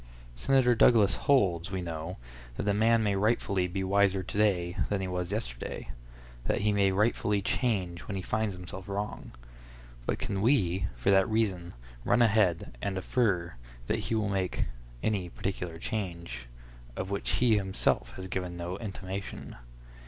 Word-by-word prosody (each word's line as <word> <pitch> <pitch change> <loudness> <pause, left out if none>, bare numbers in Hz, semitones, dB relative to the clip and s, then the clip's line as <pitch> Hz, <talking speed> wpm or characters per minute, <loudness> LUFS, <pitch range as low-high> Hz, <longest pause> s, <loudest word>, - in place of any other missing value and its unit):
Senator 125 - +4
Douglas 110 -4 +5
holds, 95 -9 +2
we 95 -1 -3
know, 80 +1 -5 0.4
that - - -2
a 100 - +4
man 110 +2 +4
may 100 -2 +1
rightfully 100 -3 +1
be 95 +2 -3
wiser 100 0 +3
to 95 - -6
day 90 -4 +2
than 100 - 0
he 95 - -2
was 90 0 -3
yesterday—that - - -5
he 105 +1 +3
may 100 -1 +3
rightfully 105 0 +2
change 95 -5 0
when 100 - -3
he 95 - -3
finds 110 0 -1
himself 90 +2 -8
wrong. 100 +2 -4 0.8
But - - 0
can 100 -1 -2
we, 95 -7 +2
for - - +1
that 95 -1 +4
reason 95 - 0 0.3
run 120 0 +4
ahead, 100 - +2
and 95 -1 -2
infer 95 - +1 0.3
that - - 0
he 115 - -1
will 105 -2 0
make 95 -2 0 0.4
any 100 -5 0
particular 90 -3 -4
change, 85 - -4 0.5
of 95 +1 -4
which 100 - -1
he 120 -4 +4
himself 95 -11 0
has 95 - -6
given 90 -1 -3
no 85 +2 -4
intimation? 100 -2 -6
95 Hz, 155 wpm, -30 LUFS, 90-105 Hz, 0.8 s, Douglas